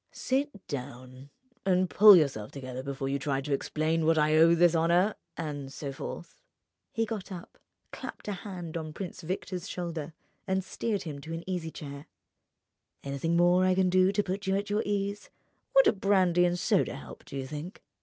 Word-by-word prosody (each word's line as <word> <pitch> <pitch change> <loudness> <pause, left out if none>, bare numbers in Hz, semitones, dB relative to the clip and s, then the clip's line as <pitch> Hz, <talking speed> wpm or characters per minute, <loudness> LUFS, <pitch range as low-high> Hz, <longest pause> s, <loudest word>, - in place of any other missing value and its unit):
Sit 265 -5 -2
down 130 -1 -7 0.3
and 185 -1 +2
pull 205 +2 +9
yourself 135 -11 +1
together 130 -2 -6
before 135 0 -4
you 140 +1 -1
try 140 -2 -1
to 140 +1 -2
explain 155 +3 0
to 160 - 0
what 165 0 +4
I 155 0 +3
owe 165 +2 +6
this 170 0 +4
honour—and 165 -4 0
so 140 0 -5
forth." 315 - -8 0.5
He 225 0 0
got 210 -3 -6
up, 180 -2 -9 0.3
clapped - - -8
a - - -1
hand 180 -4 -6
on 155 -1 -5
Prince 185 0 -6
Victor's 185 +1 -4
shoulder, 165 -3 -4 0.3
and 190 0 0
steered 205 +1 -2
him 150 -4 -6
into 155 +3 -8
an 165 - -8
easy 180 -3 -2
chair. 140 -2 -9 1.0
"Anything 140 +5 -1
more 175 +1 +5
I 185 0 +3
can 185 -1 +2
do 185 +1 +4
to 205 +1 +1
put 195 +1 -4
you 190 - +2
at 205 +1 -2
your 210 +1 +2
ease? 200 0 -2 0.5
Would - - +8
a - - +5
brandy 190 -3 +3
and 175 0 +1
soda - - +1
help, - - -11
do 140 - -8
you 135 - -3
think?" 150 - -7
170 Hz, 185 wpm, -29 LUFS, 145-190 Hz, 1.0 s, pull